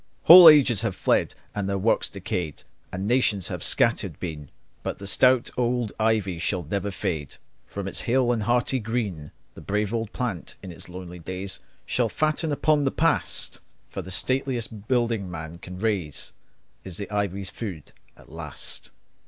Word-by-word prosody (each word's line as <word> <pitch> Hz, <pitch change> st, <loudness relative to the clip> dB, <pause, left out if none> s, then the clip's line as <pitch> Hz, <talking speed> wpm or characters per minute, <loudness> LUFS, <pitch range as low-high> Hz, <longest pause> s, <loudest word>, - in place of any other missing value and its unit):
Whole 175 Hz, 0 st, +11 dB
ages 130 Hz, -9 st, +5 dB
have 115 Hz, -5 st, -2 dB
fled, -, -, +1 dB, 0.2 s
and 100 Hz, -1 st, -2 dB
their 100 Hz, -, 0 dB
works 105 Hz, +4 st, +1 dB
decayed, 85 Hz, -5 st, -4 dB, 0.3 s
And 95 Hz, +2 st, -4 dB
nations 110 Hz, -5 st, +1 dB
have -, -, -5 dB
scattered -, -, +2 dB
been; 75 Hz, -5 st, -6 dB, 0.3 s
But -, -, -4 dB
the 100 Hz, -, -9 dB
stout 125 Hz, +5 st, +3 dB
old 120 Hz, -3 st, 0 dB
ivy 110 Hz, -6 st, +1 dB
shall 90 Hz, +1 st, -1 dB
never 100 Hz, +5 st, -2 dB
fade 80 Hz, -7 st, -4 dB, 0.3 s
From 100 Hz, -1 st, -6 dB
its -, -, -1 dB
hale 125 Hz, 0 st, +2 dB
and 115 Hz, -2 st, 0 dB
hearty 120 Hz, +4 st, +1 dB
green. 105 Hz, -10 st, -3 dB, 0.2 s
The -, -, -12 dB
brave 105 Hz, +1 st, -1 dB
old 115 Hz, -2 st, -2 dB
plant 115 Hz, -9 st, -4 dB
in 95 Hz, -, -7 dB
its 85 Hz, -, -8 dB
lonely 90 Hz, 0 st, -9 dB
days 95 Hz, +3 st, -5 dB, 0.3 s
Shall 120 Hz, -2 st, 0 dB
fatten 155 Hz, -, 0 dB
upon 150 Hz, 0 st, +2 dB
the 135 Hz, -, +2 dB
past; -, -, +1 dB, 0.3 s
For 95 Hz, -, -4 dB
the 95 Hz, -, -10 dB
stateliest 120 Hz, -1 st, -1 dB
building 115 Hz, -6 st, 0 dB
man 80 Hz, 0 st, -7 dB
can 90 Hz, +1 st, -9 dB
raise 95 Hz, -8 st, -2 dB, 0.5 s
Is 90 Hz, -3 st, -7 dB
the 100 Hz, -, -5 dB
ivy's 100 Hz, -2 st, -2 dB
food 95 Hz, -10 st, -7 dB, 0.3 s
at -, -, -18 dB
last. -, -, -4 dB
105 Hz, 165 wpm, -25 LUFS, 90-120 Hz, 0.5 s, Whole